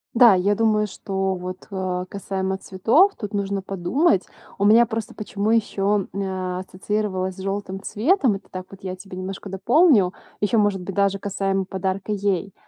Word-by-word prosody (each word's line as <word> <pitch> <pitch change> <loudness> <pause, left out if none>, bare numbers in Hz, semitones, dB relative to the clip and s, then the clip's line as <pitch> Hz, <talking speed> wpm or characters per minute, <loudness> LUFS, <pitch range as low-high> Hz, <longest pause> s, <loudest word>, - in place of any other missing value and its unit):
Да, 235 -2 +8
я 195 +3 +2
думаю, 215 -1 +2
что 190 -1 -2
вот, 185 +1 -7
а 185 -1 -2
касаемо 190 0 -3
цветов, 230 - +3
тут 210 -2 -6
нужно 200 -1 -1
подумать. 195 - +1 0.3
У 200 - +1
меня 225 +3 +7
просто 225 -2 -4
почему 210 0 -2
ещё, 205 -3 +1
м, 200 - -3
а, 185 -1 -3
ассоциировалась 190 0 -2
с - - -14
жёлтым 195 0 -4
цветом. 265 - +2
Это 195 - -11
так 185 0 -6
вот 195 0 -13
я 185 -1 -4
тебе 185 0 -10
немножко 195 +2 -6
дополню. 205 - +4 0.3
Ещё, 210 +3 +2
может 205 -3 +2
быть, 180 +1 -6
даже 200 0 +2
касаемо 195 -1 -1
подарка 190 +2 -3
ей. 200 -2 -1
195 Hz, 170 wpm, -23 LUFS, 190-210 Hz, 0.3 s, Да